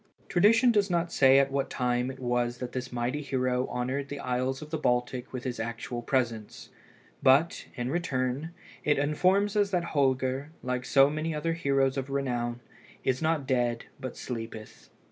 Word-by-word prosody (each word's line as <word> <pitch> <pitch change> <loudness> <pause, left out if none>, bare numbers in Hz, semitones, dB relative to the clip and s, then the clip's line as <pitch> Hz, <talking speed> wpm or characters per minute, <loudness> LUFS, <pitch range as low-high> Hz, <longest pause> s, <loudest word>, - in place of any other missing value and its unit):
Tradition 225 +7 +5
does 205 -3 +2
not 170 -1 0
say 135 0 +6
at 140 0 +3
what 140 0 -1
time 125 0 0
it 130 - -7
was 120 -1 0
that 125 0 -5
this 125 0 -5
mighty 125 +4 -2
hero 130 -2 0
honoured 130 +3 -3
the 145 - -5
isles 130 +1 -1
of 155 - -12
the 160 - 0
Baltic 125 -2 0
with 125 -1 -5
his 125 -2 -4
actual 115 +1 -4
presence, 115 -4 -2 0.5
but, 140 +5 +3
in 125 0 -3
return, 140 -3 -1 0.3
it 150 - +2
informs 185 +8 +2
us 205 -1 +3
that 180 -3 0
Holger, 130 0 +1
like 125 0 -2
so 135 0 +6
many 155 +1 -2
other 165 +2 -1
heroes 135 -4 +1
of 135 0 -3
renown, 120 -3 -2 0.4
"is 130 -1 0
not 160 -3 +1
dead, 120 -3 0
but 130 -2 -6
sleepeth." 115 -3 -7
130 Hz, 170 wpm, -28 LUFS, 125-150 Hz, 0.5 s, say